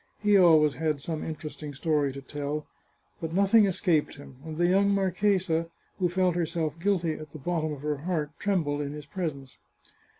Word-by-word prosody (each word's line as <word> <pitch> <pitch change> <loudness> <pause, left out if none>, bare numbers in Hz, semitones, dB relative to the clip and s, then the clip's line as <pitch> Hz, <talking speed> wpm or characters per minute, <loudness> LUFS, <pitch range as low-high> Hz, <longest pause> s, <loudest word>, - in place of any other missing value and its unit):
He 210 -1 +3
always 160 -6 +6
had 155 +1 -1
some 155 +2 -4
entertaining 150 -2 -6
story 145 -1 +1
to 135 +1 -9
tell; 145 +2 -4 0.6
but 165 -1 -4
nothing 200 +3 +5
escaped 180 -5 +1
him, 140 -2 -13
and 160 -1 -7
the 175 - +3
young 195 +3 +4
marchesa, 190 -3 +1 0.3
who 180 -2 +2
felt 180 0 +2
herself 165 -2 -2
guilty 175 -3 +1
at 155 -1 -8
the 155 - -10
bottom 155 +1 -2
of 145 -2 -6
her 150 -1 -1
heart, 155 -1 -2
trembled 160 -8 0
in 145 0 -4
his 150 -1 -8
presence. 145 -6 -5
160 Hz, 175 wpm, -28 LUFS, 150-180 Hz, 0.6 s, always